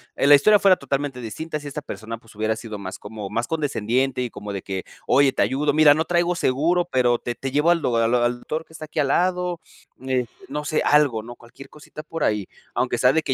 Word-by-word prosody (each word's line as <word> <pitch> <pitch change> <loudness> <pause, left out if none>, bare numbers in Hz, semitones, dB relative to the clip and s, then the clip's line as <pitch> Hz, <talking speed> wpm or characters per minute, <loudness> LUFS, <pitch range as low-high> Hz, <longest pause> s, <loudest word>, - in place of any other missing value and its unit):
eh, - - +1
la 145 - +10
historia 210 +8 +5
fuera 195 -1 +6
totalmente 140 -1 -3
distinta 150 +8 -5
si 145 - -9
esta 145 +1 -5
persona 115 -3 -7
pues 115 - -19
hubiera 110 +1 0
sido 110 -2 -7
más 95 -2 -7
como 105 -1 -7
más 115 +1 -1
condescendiente 135 -4 -1
y 125 - -2
como 105 -2 -7
de 95 - -4
que 95 -1 -5 0.2
"oye, 135 +1 +4
te - - 0
ayudo, 145 +2 +1
mira 150 -1 +7
no 160 - 0
traigo 175 0 +1
seguro 170 +4 +1
pero 120 -2 +3
te 120 - -4
te 135 - -4
llevo 150 +5 +3
al 170 -2 +1
o 120 -2 +1
al 115 +1 +2
o 120 -1 +3
al 120 0 +1
doctor 155 +5 -4
que - - -24
está 155 - -8
aquí 155 - -5
al 140 - +2
lado", 180 0 +1 0.5
eh, 125 -2 0 0.2
no 150 +1 -4
sé, 150 +1 0
algo, 140 -7 +3
¿no? 120 +1 -9
Cualquier 120 +3 -15
cosita 150 0 -11
por 165 0 -5
ahí, 105 -3 +1 0.3
aunque 125 0 0
sea 125 0 +5
de 160 -1 +1
que 135 - 0
135 Hz, 250 wpm, -23 LUFS, 120-155 Hz, 0.5 s, la